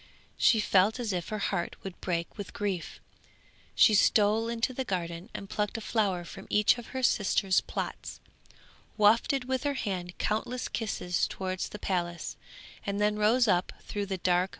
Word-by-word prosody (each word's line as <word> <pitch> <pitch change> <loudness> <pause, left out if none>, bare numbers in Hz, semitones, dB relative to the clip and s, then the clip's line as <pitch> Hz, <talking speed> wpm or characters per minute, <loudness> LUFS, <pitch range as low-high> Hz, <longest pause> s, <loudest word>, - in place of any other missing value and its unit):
She 225 - +4
felt 205 +3 +3
as 225 -5 -2
if 175 -2 -3
her 215 - -2
heart 195 -4 -2
would 190 -2 -8
break 170 -2 -2
with 205 -3 -7
grief. 195 -4 -3 0.8
She 220 - +6
stole 215 +2 +4
into 235 +2 -1
the 265 - -2
garden 175 -3 -4
and 200 - -6
plucked 210 +2 -2
a - - -5
flower 200 -6 0
from 195 +3 -10
each 210 +3 +4
of 235 - -10
her 260 0 -5
sisters' 195 -4 +3
plots, - - -5 0.8
wafted 230 +6 +4
with 260 0 -1
her 285 -1 0
hand 180 -7 -4
countless 240 +4 -2
kisses 190 -5 -1
towards 185 -1 -3
the - - -7
palace, 175 -4 -2 0.5
and 200 0 -2
then 210 0 +2
rose 225 +4 +4
up 180 -2 +2
through 205 -1 -4
the 190 -1 -2
dark - - -26
blue 180 -1 +4
water. 185 - -3
205 Hz, 175 wpm, -29 LUFS, 185-225 Hz, 0.8 s, She